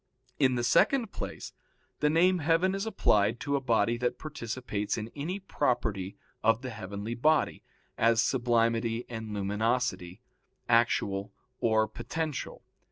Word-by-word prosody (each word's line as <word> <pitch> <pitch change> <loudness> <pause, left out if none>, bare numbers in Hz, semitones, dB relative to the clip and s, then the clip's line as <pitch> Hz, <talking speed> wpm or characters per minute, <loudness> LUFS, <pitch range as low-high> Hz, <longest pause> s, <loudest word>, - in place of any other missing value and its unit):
In 130 -3 +4
the 120 - -1
second 230 - +3
place, - - -6 0.5
the 150 - +3
name 180 +4 +4
heaven 165 +4 +2
is 195 +3 -2
applied 105 - +2
to 140 0 0
a 140 - 0
body 115 -2 +2
that 125 +1 -1
participates 120 -7 -4
in 110 +1 -5
any 165 +7 -3
property 110 - -1 0.3
of 115 +3 +3
the 130 - -4
heavenly 100 +1 -5
body, 150 +5 +2 0.4
as 115 0 +4
sublimity 115 -1 +1
and 110 -2 -6
luminosity, 105 -1 -1 0.4
actual 110 -4 +2 0.3
or 110 -1 +2
potential. 155 +7 -4
120 Hz, 130 wpm, -29 LUFS, 110-145 Hz, 0.5 s, In